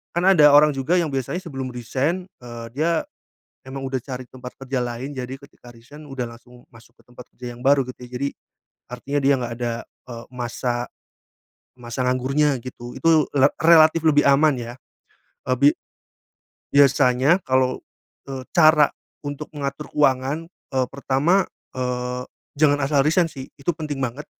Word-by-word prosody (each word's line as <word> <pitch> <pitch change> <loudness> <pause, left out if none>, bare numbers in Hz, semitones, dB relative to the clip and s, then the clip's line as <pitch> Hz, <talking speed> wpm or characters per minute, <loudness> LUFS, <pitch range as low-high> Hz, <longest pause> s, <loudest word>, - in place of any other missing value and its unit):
Kan, 175 - +1
ada 155 -6 +7
orang 150 +1 +7
juga 135 +6 0
yang 165 -4 0
biasanya 135 +6 -2
sebelum 135 -6 -5
resign, 135 +9 -2 0.2
eee, 120 -1 -8
dia 160 +4 0 0.6
emang 135 +1 -6
udah 130 0 -2
cari 130 -1 -6
tempat 125 -1 -10
kerja 135 -1 -3
lain, 125 +4 -5
jadi 130 +1 -5
ketika 140 -3 -17
resign 135 +7 -14
udah 135 -2 -4
langsung 125 +1 -19
masuk 115 -1 -19
ke - - -21
tempat 125 0 -13
kerja 120 -1 -8
yang - - -14
baru, 140 0 +5
gitu, 125 - -9
ya. - - -25
Jadi 140 - 0 0.6
artinya 140 +4 -3
dia 140 +1 +5
nggak 120 -1 -4
ada, 120 -1 -2 0.4
eee, 115 0 -8
masa 120 0 -3 0.9
masa 120 +2 -4
nganggurnya, 135 +3 +1
gitu, 120 -1 -9
itu 160 -2 +4
le 140 +1 +6
relatif 160 0 +6
lebih 145 -2 +4
aman, 145 +2 +5
ya. 120 0 -6 0.7
Eee, 130 - +2
bi 140 - +7 1.0
biasanya 140 +3 +4
kalau, 130 -1 +1 0.5
eee, 130 -1 -5
cara 155 -3 +6 0.3
untuk 145 +1 -6
mengatur 140 +1 -4
keuangan, 140 +2 +1 0.3
eee, 130 -1 +2
pertama, 140 +7 +1 0.3
eee, 125 0 -3 0.3
jangan 145 -1 +4
asal 140 0 +3
resign, 165 +3 +3
sih, 130 -1 -9
itu 140 +5 -1
penting 150 -3 -5
banget. 135 +3 -4
135 Hz, 155 wpm, -22 LUFS, 125-150 Hz, 1.0 s, ada